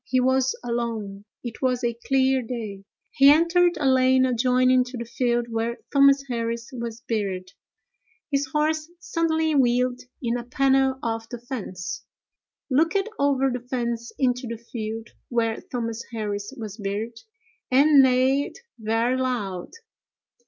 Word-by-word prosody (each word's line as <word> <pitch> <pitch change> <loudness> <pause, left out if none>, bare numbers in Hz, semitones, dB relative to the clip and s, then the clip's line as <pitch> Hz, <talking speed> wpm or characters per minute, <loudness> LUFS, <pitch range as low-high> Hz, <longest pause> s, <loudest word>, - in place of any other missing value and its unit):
He 255 - +1
was 260 +1 +2
alone: 225 -4 -3 0.2
it 235 -2 -7
was 255 -2 +1
a 235 0 +1
clear 265 +2 +1
day. 220 -5 -6 0.3
He 275 +1 +6
entered 340 +3 +4
a 295 - -2
lane 260 0 +4
adjoining 255 +1 +3
to 250 0 -7
the 235 - -4
field 240 0 0
where 230 +1 -1 0.2
Thomas 275 0 +6
Harris 230 -1 -3
was 235 -2 -5
buried. 190 -5 -3 0.8
His 275 0 +1
horse 305 +3 0
suddenly 320 -1 0
wheeled 250 -2 +2 0.2
in 235 0 -1
a 240 - -5
panel 265 +1 +2
of 225 -1 -3
the 245 - -5
fence, 195 -7 -6 0.7
looked 330 +9 +2
over 270 -1 +2
the 250 - -2
fence 235 -1 -3
into 250 -2 0
the 230 0 -4
field 225 -1 -6 0.2
where 230 -2 0
Thomas 230 -2 -4
Harris 205 -2 -3
was 215 -3 -7
buried, 215 +3 -4 0.5
and 280 +2 +6
neighed 260 +2 +2 0.2
very 225 +3 +1
loud. 210 -9 -2
245 Hz, 140 wpm, -24 LUFS, 230-265 Hz, 0.8 s, He